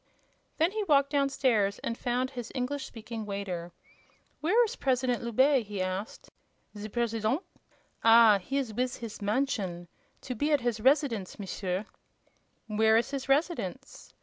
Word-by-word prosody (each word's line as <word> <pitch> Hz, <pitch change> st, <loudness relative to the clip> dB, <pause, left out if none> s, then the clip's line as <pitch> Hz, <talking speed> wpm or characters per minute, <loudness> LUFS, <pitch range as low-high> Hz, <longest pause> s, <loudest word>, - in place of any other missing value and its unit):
Then 325 Hz, +3 st, +3 dB
he 430 Hz, 0 st, -2 dB
walked 280 Hz, -4 st, +3 dB
down 280 Hz, -1 st, +2 dB
stairs 220 Hz, -7 st, +1 dB
and 230 Hz, -, -2 dB
found 250 Hz, +2 st, -1 dB
his 245 Hz, -4 st, -7 dB
English 265 Hz, +2 st, -2 dB
speaking 225 Hz, 0 st, -7 dB
waiter. 195 Hz, -4 st, -4 dB, 0.7 s
"Where's 450 Hz, +8 st, +2 dB
President 255 Hz, -, 0 dB
Loubet?" 255 Hz, +1 st, +3 dB
he 205 Hz, -2 st, -5 dB
asked. 185 Hz, +3 st, -4 dB, 0.4 s
"Ze 210 Hz, +1 st, -6 dB
President! 230 Hz, -, -1 dB, 0.6 s
Ah, 225 Hz, -2 st, +7 dB
he 270 Hz, +9 st, -3 dB
is 255 Hz, -6 st, -2 dB
wiz 250 Hz, +2 st, -1 dB
his 230 Hz, -4 st, -8 dB
mansion. 205 Hz, -6 st, -1 dB, 0.3 s
To 255 Hz, -, -5 dB
be 290 Hz, +6 st, -1 dB
at 290 Hz, -3 st, +3 dB
his 235 Hz, -2 st, -1 dB
residence, 260 Hz, -7 st, +2 dB
M'sieur." 190 Hz, -1 st, -3 dB, 0.8 s
"Where 220 Hz, 0 st, +3 dB
is 235 Hz, +4 st, 0 dB
his 275 Hz, -1 st, -4 dB
residence?" 270 Hz, -, -2 dB
235 Hz, 145 wpm, -29 LUFS, 210-275 Hz, 0.8 s, Ah